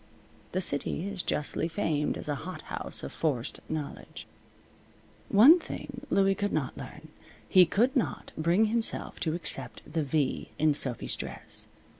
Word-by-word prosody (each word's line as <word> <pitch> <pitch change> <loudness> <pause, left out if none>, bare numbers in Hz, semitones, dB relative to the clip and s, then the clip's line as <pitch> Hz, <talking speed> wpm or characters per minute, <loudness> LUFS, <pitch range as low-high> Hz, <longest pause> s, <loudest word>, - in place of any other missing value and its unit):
The 185 - +1
city 155 +3 0
is 200 -2 -3
justly 150 +1 -1
famed 160 -5 -1
as - - -2
a 145 - 0
hot - - -7
house - - -2
of 70 - -6
forced 135 -7 -1
knowledge. 155 -2 -6 1.0
One 275 - +8
thing 270 -4 -8
Louie 195 0 +4
could 205 +1 -2
not 140 -5 -1
learn. - - -10 0.4
He 185 -2 +7
could 240 +9 +2
not 255 - -1
bring 170 +7 +3
himself 225 +1 0
to 160 -1 0
accept 175 - -2
the 160 +1 -2
V 145 -1 -1
in 155 -1 +3
Sophy's 130 -4 0
dress. - - -3
165 Hz, 150 wpm, -29 LUFS, 150-205 Hz, 1.0 s, One